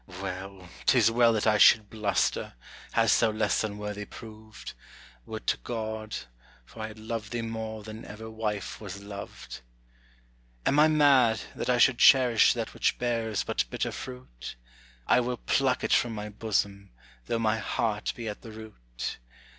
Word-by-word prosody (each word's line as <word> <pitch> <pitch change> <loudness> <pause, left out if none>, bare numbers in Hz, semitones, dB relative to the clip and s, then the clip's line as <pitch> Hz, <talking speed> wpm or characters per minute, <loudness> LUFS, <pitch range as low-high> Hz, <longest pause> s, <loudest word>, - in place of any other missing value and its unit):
Well 95 0 -6 0.2
't 130 - +5
is 115 -2 +5
well 120 0 +5
that 110 - 0
I 105 -1 +3
should 105 -1 +6
bluster! 105 - 0 0.4
Hadst - - +4
thou - - +3
less 110 -2 0
unworthy 105 -1 -4
proved, 110 0 -11 0.5
Would - - -7
to - - +1
God 110 - -5 0.5
for 110 - -11
I 110 - -3
had 110 0 -11
loved 110 -1 -5
thee 120 -1 -2
more 110 -1 -5
than 110 +1 -9
ever 110 +2 -9
wife 110 -3 -4
was 100 -2 -7
loved. 100 -9 -9 1.0
Am 145 - +3
I 155 - +7
mad, 135 -8 +4
that - - -4
I 125 - +4
should 120 0 +4
cherish 125 -4 +6
that 115 -2 -4
which - - +1
bears 115 -5 -1
but - - -1
bitter - - -2
fruit? - - -8 0.5
I - - +4
will 125 0 -1
pluck 130 0 +1
it - - +1
from 120 -2 +2
my 105 0 -5
bosom, 100 -2 -2 0.4
though 115 - 0
my 110 -1 +1
heart 105 0 -1
be 115 -2 -6
at 105 - -5
the 115 - -10
root. 80 - -7
110 Hz, 165 wpm, -28 LUFS, 105-115 Hz, 1.0 s, I